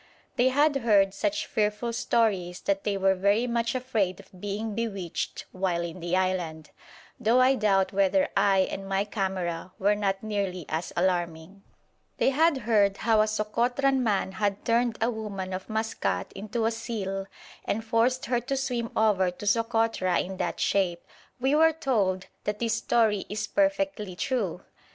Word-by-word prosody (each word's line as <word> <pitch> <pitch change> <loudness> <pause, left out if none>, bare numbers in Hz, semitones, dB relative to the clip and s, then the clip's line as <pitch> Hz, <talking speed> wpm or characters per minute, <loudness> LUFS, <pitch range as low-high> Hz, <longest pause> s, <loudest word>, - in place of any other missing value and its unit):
They 250 +2 +4
had 290 +2 +3
heard 205 -6 +3
such 305 +9 -1
fearful 215 +2 -1
stories 195 -7 0
that 195 0 -1
they 200 -1 0
were 195 0 +3
very 200 +5 +2
much 235 0 -1
afraid 220 -8 -1
of 185 - -16
being 205 +2 -3
bewitched 200 -6 -4
while 185 -2 -1
in 170 +1 -6
the 175 +1 0
island, 175 -5 -2 0.5
though 240 +1 +3
I 255 +1 +5
doubt 195 -6 +2
whether 200 +10 +3
I 195 -1 +4
and 195 0 -6
my 195 +1 +1
camera 185 -4 -3
were 205 +2 +3
not 195 -1 -1
nearly 200 -5 -2
as 160 +2 -3
alarming. 175 +1 -1 0.6
They - - +3
had 315 +2 +3
heard 205 -3 +3
how 220 -2 +5
a 215 - +2
Sokotran 245 +5 +1
man 205 -5 0
had 200 0 -2
turned 235 0 +2
a 230 +2 +1
woman 200 -4 -5
of 185 +3 -6
Maskat 220 +1 -2
into 215 +3 -3
a 225 - +2
seal 200 -4 -4 0.4
and 220 +2 -2
forced 230 +3 +1
her 245 0 +1
to 265 +3 -3
swim 245 -3 -2
over 205 -4 +3
to 180 +3 -9
Sokotra 225 -4 +1
in 190 +1 -4
that - - -2
shape. 180 -4 +1 0.4
We 265 +3 +1
were 320 +1 +5
told 205 -11 0 0.2
that 210 0 -1
this 230 0 0
story 220 -3 +1
is 210 0 -2
perfectly 290 -10 0
true! 200 -5 -2
210 Hz, 165 wpm, -27 LUFS, 190-235 Hz, 0.6 s, I